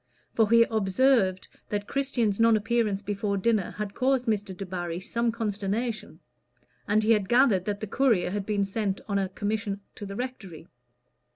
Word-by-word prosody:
For 220 Hz, -2 st, +3 dB
he 230 Hz, 0 st, +7 dB
observed 215 Hz, -2 st, +2 dB, 0.2 s
that 205 Hz, -1 st, -3 dB
Christian's 245 Hz, -7 st, 0 dB
non 230 Hz, -1 st, +5 dB
appearance 215 Hz, -2 st, 0 dB
before 200 Hz, 0 st, -2 dB
dinner 210 Hz, -1 st, +1 dB
had 210 Hz, -1 st, -5 dB
caused 260 Hz, -1 st, +1 dB
Mr. 210 Hz, -3 st, -1 dB
Debarry 175 Hz, -3 st, -4 dB
some 235 Hz, +5 st, -1 dB
consternation; 215 Hz, -3 st, -3 dB, 0.7 s
and 215 Hz, +1 st, +2 dB
he 220 Hz, -, +3 dB
had 210 Hz, -4 st, +2 dB
gathered 240 Hz, -7 st, +4 dB
that 205 Hz, -1 st, -3 dB
the -, -, -2 dB
courier 220 Hz, -5 st, +1 dB
had 200 Hz, 0 st, -3 dB
been 205 Hz, -2 st, +1 dB
sent 195 Hz, -1 st, -2 dB
on 200 Hz, -1 st, 0 dB
a 190 Hz, -1 st, -1 dB
commission 205 Hz, 0 st, -3 dB
to 205 Hz, -, -8 dB
the 195 Hz, -, -7 dB
rectory. 200 Hz, -10 st, -6 dB
210 Hz, 165 wpm, -27 LUFS, 195-230 Hz, 0.7 s, he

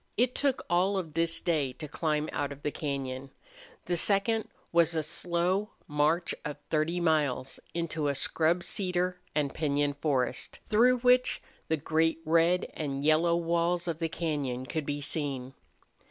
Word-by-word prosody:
It 245 Hz, +2 st, +3 dB
took 275 Hz, -2 st, +1 dB
all 185 Hz, +3 st, +2 dB
of 165 Hz, -5 st, -4 dB
this 165 Hz, +1 st, +1 dB
day 150 Hz, -6 st, 0 dB
to 150 Hz, -, -7 dB
climb 150 Hz, 0 st, -1 dB
out 145 Hz, -1 st, -1 dB
of 140 Hz, 0 st, -10 dB
the 150 Hz, -, -1 dB
cañon. 135 Hz, -3 st, -4 dB, 0.6 s
The 175 Hz, -, 0 dB
second 205 Hz, +5 st, +2 dB, 0.2 s
was 170 Hz, -1 st, +3 dB
a 160 Hz, -, +1 dB
slow 180 Hz, +6 st, 0 dB
march 155 Hz, +4 st, +1 dB
of 150 Hz, -1 st, -4 dB
thirty 160 Hz, +3 st, +1 dB
miles 150 Hz, -6 st, 0 dB, 0.2 s
into 165 Hz, -3 st, -1 dB
a 140 Hz, -, 0 dB
scrub 165 Hz, +5 st, +2 dB
cedar 180 Hz, 0 st, 0 dB, 0.2 s
and 145 Hz, -3 st, 0 dB
piñon 145 Hz, -2 st, 0 dB
forest, 140 Hz, -4 st, -1 dB
through 245 Hz, +3 st, +4 dB
which 250 Hz, 0 st, +4 dB, 0.3 s
the 160 Hz, -, +1 dB
great 160 Hz, +2 st, +1 dB
red 165 Hz, +3 st, +3 dB
and 140 Hz, -2 st, -3 dB
yellow 160 Hz, +3 st, +4 dB
walls 170 Hz, +1 st, 0 dB
of 165 Hz, -2 st, -2 dB
the 165 Hz, -1 st, -1 dB
cañon 140 Hz, -7 st, -2 dB
could 155 Hz, +2 st, -3 dB
be 145 Hz, 0 st, -2 dB
seen. 140 Hz, -3 st, -3 dB
160 Hz, 155 wpm, -29 LUFS, 145-175 Hz, 0.6 s, through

